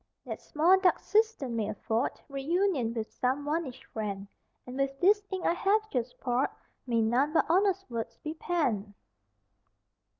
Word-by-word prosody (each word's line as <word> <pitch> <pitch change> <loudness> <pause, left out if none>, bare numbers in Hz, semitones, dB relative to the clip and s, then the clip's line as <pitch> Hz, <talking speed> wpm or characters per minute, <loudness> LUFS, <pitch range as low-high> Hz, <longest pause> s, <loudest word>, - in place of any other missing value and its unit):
That - - -6
small 345 +5 +4
dark 375 -1 +4
cistern 430 - +1
may 215 -2 -1
afford 220 +3 -1
Reunion 280 - 0
with 225 -1 -3
some 265 +2 0
vanished 295 -4 -2
friend, 200 -2 -3 0.4
And 250 - -8
with 275 0 -1
this 410 +3 +4
ink 375 -2 -3
I - - +4
have 430 +4 +1
just 245 -1 -2
poured 250 +1 +1 0.4
May 230 -2 +2
none 255 +7 +2
but - - +4
honest 390 +2 +2
words 230 -2 -5
be 310 - -5
penned! 245 - -1
275 Hz, 155 wpm, -30 LUFS, 235-360 Hz, 0.4 s, small